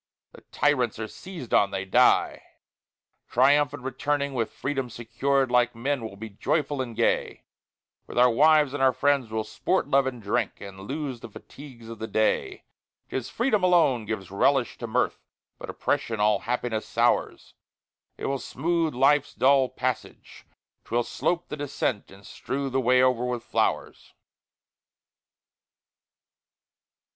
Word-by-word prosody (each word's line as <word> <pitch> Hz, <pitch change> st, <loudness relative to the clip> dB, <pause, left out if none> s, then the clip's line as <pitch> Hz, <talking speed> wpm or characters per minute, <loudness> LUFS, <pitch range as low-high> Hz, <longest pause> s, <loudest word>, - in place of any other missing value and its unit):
The -, -, -15 dB
tyrants 130 Hz, -6 st, +1 dB
are 110 Hz, 0 st, -4 dB
seized 175 Hz, -, -9 dB
on, 100 Hz, -, +4 dB
they 95 Hz, 0 st, -4 dB
die! 95 Hz, -, +3 dB, 0.9 s
Triumphant 145 Hz, +2 st, +2 dB
returning 140 Hz, +2 st, -2 dB
with 115 Hz, -4 st, -1 dB
Freedom 135 Hz, -2 st, -3 dB
secur'd, 130 Hz, +3 st, -1 dB
Like 125 Hz, -1 st, +2 dB
men, 130 Hz, +2 st, -2 dB
we'll 110 Hz, -3 st, -7 dB
be 110 Hz, +3 st, -8 dB
joyful 145 Hz, +6 st, -1 dB
and 120 Hz, -3 st, -6 dB
gay 115 Hz, -, 0 dB, 0.6 s
With -, -, -9 dB
our 125 Hz, +1 st, +7 dB
wives 150 Hz, +2 st, +4 dB
and 145 Hz, -, -3 dB
our 130 Hz, -1 st, +4 dB
friends, 135 Hz, -1 st, +1 dB
we'll 110 Hz, 0 st, -2 dB
sport, 140 Hz, +13 st, -1 dB
love, 135 Hz, 0 st, +3 dB
and 125 Hz, -2 st, -4 dB
drink, 100 Hz, -2 st, -2 dB
And 100 Hz, -1 st, -10 dB
lose 140 Hz, -4 st, -4 dB
the 115 Hz, -, -10 dB
fatigues 120 Hz, +1 st, -13 dB
of 115 Hz, -1 st, -9 dB
the 110 Hz, -, -4 dB
day. 110 Hz, 0 st, 0 dB, 0.5 s
'Tis 130 Hz, -3 st, -3 dB
freedom 235 Hz, -4 st, +1 dB
alone 165 Hz, -11 st, +3 dB
gives 100 Hz, -4 st, -5 dB
a -, -, -9 dB
relish 135 Hz, +3 st, +2 dB
to 120 Hz, -, -5 dB
mirth, 120 Hz, +3 st, 0 dB, 0.4 s
But -, -, -8 dB
oppression 115 Hz, -2 st, -2 dB
all 105 Hz, 0 st, +3 dB
happiness 120 Hz, -2 st, -3 dB
sours; -, -, 0 dB, 0.6 s
It -, -, -6 dB
will 135 Hz, 0 st, -1 dB
smooth 165 Hz, +2 st, -1 dB
life's 140 Hz, +2 st, +3 dB
dull 130 Hz, +2 st, +4 dB
passage, 130 Hz, -1 st, -5 dB, 0.4 s
'twill 120 Hz, +1 st, -1 dB
slope 175 Hz, +7 st, -2 dB
the 150 Hz, -, -5 dB
descent, 135 Hz, -6 st, -3 dB
And 95 Hz, +1 st, -16 dB
strew 135 Hz, 0 st, -4 dB
the 135 Hz, +1 st, +1 dB
way 125 Hz, +1 st, +4 dB
over 125 Hz, -2 st, +2 dB
with 125 Hz, -1 st, -3 dB
flowers. -, -, -2 dB
130 Hz, 150 wpm, -26 LUFS, 115-140 Hz, 0.9 s, our